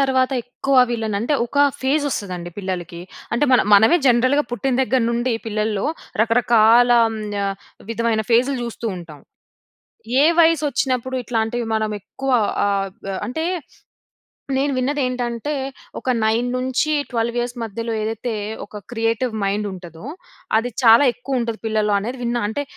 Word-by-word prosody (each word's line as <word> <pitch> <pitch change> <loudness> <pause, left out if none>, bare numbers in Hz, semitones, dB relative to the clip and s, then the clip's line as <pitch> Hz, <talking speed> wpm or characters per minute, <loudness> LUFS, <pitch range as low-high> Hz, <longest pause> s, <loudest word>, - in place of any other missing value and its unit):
తర్వాత 260 -1 +2
ఎక్కువ 265 +3 -1
వీళ్ళని 220 -3 -2
అంటే, 265 +6 0
ఒకా 285 +4 +2 0.2
ఫేజొస్తదండి 235 - -1
పిల్లలకి. 175 -3 -5 0.3
అంటే, 235 +5 +2
మన 250 - +6
మనమే 220 +12 +6
జనరల్‌గా 255 +4 +3
పుట్టిన 245 +2 -1
దగ్గర 260 -1 +1
నుండి 240 +1 0
పిల్లల్లో 215 -1 -1 0.4
రకరకాల 235 +1 +4 0.2
ఆహ్, 225 -1 -4 0.2
య - - 0 0.5
విధమైన 230 -1 0
ఫేజ్‌లు 255 +4 +3
జూస్తూ 235 0 -5
ఉంటాం. 160 -5 -10 1.0
ఏ - - +6 0.2
వయసొచ్చినప్పుడు 270 -6 +2
ఇట్లాంటివి 230 0 -1
మనం 215 -1 -1
ఎక్కువ 270 +6 -4 0.3
ఆహ్, 195 -1 0 0.2
బ్ - - -4 0.2
అంటే, 320 +7 -3 1.1
నేను 280 +1 +1
విన్నదేంటంటే, 255 -1 -1 0.5
ఒక - - -16 0.2
9-12 245 +1 0
ఇయర్స్ 240 +1 -3
మధ్యలో 230 +1 -4
ఏదైతే, 225 +2 -3 0.3
ఒక 210 0 -9
క్రియేటివ్ 230 +1 -1
మైండుంటదో, 195 -3 -4 0.5
అది 235 +2 0
చాలా 230 +3 +7
ఎక్కువుంటది 245 -3 -3
పిల్లల్లో 215 -1 +1
అనేది 245 +5 -5
విన్నా. 240 0 -1
అంటే, 285 +6 -3
235 Hz, 125 wpm, -21 LUFS, 220-255 Hz, 1.1 s, చాలా